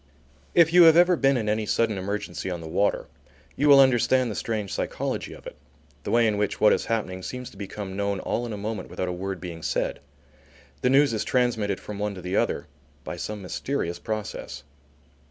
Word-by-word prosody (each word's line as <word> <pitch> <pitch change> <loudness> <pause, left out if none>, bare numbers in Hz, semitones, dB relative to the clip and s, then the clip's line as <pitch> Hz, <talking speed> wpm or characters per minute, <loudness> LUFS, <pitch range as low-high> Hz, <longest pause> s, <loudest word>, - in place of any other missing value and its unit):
If 165 -1 +5
you 180 - +8
have 160 0 +7
ever 175 +1 +6
been 135 -4 +3
in 110 -3 -2
any 105 0 0
sudden 115 -1 +1
emergency 95 -2 -4
on 90 -2 -3
the 80 - -8
water, 95 +6 0 0.5
you 145 +1 +2
will 140 -1 +9
understand 130 -1 +4
the - - -5
strange 105 -4 -3
psychology - - -3
of - - -12
it, - - -8 0.5
the - - -3
way 115 0 +4
in 105 -2 +1
which 105 - -1
what 105 - +6
is - - -1
happening 100 -5 -2
seems 125 +6 -6
to - - -17
become 100 -1 -6
known 100 -1 -1
all 120 +5 -2
in - - -6
a 105 - -4
moment 110 +2 -5
without 90 - -3
a - - -2
word 95 +1 -4
being 85 -2 -7
said. - - -1 0.8
The 125 - +2
news 135 -1 +4
is 110 - -1
transmitted 115 -6 0
from 105 -1 -8
one 105 -1 -2
to 90 - -8
the 90 +1 -3
other - - 0 0.4
by - - -5
some 105 -2 -5
mysterious 90 -3 -3
process. 110 +3 -5
105 Hz, 210 wpm, -25 LUFS, 95-125 Hz, 0.8 s, will